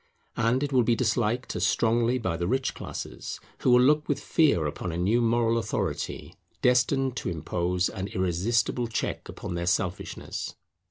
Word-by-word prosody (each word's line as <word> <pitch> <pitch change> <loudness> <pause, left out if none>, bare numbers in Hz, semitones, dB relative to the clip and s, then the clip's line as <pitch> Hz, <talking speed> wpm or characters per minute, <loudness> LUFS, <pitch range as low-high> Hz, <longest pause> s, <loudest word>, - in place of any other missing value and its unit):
And 115 +4 +2
it 145 -1 -2
will 130 - +5
be 120 0 +2
disliked 120 +1 0
as - - -1
strongly 115 +2 +2
by 110 -9 -2
the 85 +1 -2
rich 130 +4 0
classes, - - -6 0.2
who - - +1
will 125 0 +7
look 150 +3 +3
with 145 -2 +1
fear 145 - +2
upon 75 +3 -3
a 80 - -4
new 105 +7 +2
moral 115 0 +2
authority - - -3 0.3
destined 130 +1 +3
to - - -2
impose 90 +2 -1
an 95 +1 -4
irresistible 100 +6 0
check 110 - -3
upon - - -6
their 85 0 -3
selfishness. 90 -1 -2
115 Hz, 165 wpm, -27 LUFS, 90-125 Hz, 0.3 s, will